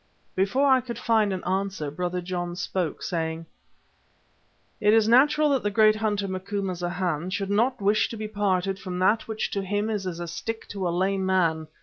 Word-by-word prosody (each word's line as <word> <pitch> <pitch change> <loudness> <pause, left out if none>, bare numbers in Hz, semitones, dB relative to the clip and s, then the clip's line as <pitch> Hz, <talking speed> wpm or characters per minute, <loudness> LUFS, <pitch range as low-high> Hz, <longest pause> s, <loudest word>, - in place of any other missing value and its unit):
Before 200 +9 +1
I 260 -1 +5
could 240 -1 -6
find 220 -3 +2
an 185 -1 -3
answer 190 -5 -2
Brother 180 +3 -3
John 175 -1 -4
spoke, 180 -3 -3
saying: 165 -1 -3 1.3
"It 210 +1 +4
is 220 -1 +4
natural 295 +6 +5
that 270 -3 +2
the 205 - 0
great 215 +1 +4
hunter, 205 -2 -1
Macumazana, 185 -3 -3
should 195 +1 -2
not 235 +6 +2
wish 205 +1 +2
to 230 - -6
be 215 0 -4
parted 195 -2 0
from 185 -3 -5
what 190 +5 +2
which 220 -1 -3
to 200 - -1
him 205 +3 -1
is 200 -3 -2
as 170 -2 -4
a 175 - -4
stick 225 +7 -5
to 195 -3 -3
a - - 0
lame 190 +3 0
man. 165 -4 +1
195 Hz, 190 wpm, -26 LUFS, 180-215 Hz, 1.3 s, I